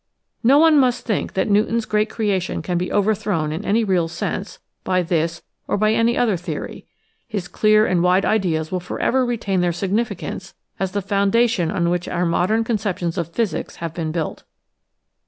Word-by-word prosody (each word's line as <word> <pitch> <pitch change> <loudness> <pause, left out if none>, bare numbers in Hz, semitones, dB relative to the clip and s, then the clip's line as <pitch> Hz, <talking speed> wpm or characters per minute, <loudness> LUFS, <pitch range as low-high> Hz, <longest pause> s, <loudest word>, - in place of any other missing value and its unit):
No 260 +4 +5
one 315 -1 +6
must 250 -2 +1
think 215 -5 -1
that 190 - 0
Newton's 220 +2 +2
great 215 0 +1
creation 200 -5 -1
can 180 - -2
be 180 +1 -1
overthrown 205 -6 0
in 160 +6 -4
any 220 +3 +2
real 185 -5 +1
sense 165 - -4 0.3
by 185 -1 +1
this 165 0 -1 0.2
or - - 0
by 215 +1 +2
any 230 +1 +2
other 220 -6 +2
theory. 175 - -6 0.4
His 205 -6 -4
clear 215 +2 +3
and 180 -4 +1
wide 180 +2 +3
ideas 170 -7 0
will 185 - -1
forever 255 +8 0
retain 220 -6 -1
their 175 -1 +2
significance 195 +1 -3 0.2
as 190 -1 -2
the 205 -1 -1
foundation 200 -1 +2
on 170 -1 0
which 175 0 -1
our 180 0 -1
modern 185 +7 +1
con 225 -1 0
ceptions 180 -5 -2
of 170 -3 -3
physics 210 -9 -2
have 165 -1 -5
been 160 -2 -3
built. 165 -1 -3
195 Hz, 180 wpm, -21 LUFS, 175-220 Hz, 0.4 s, one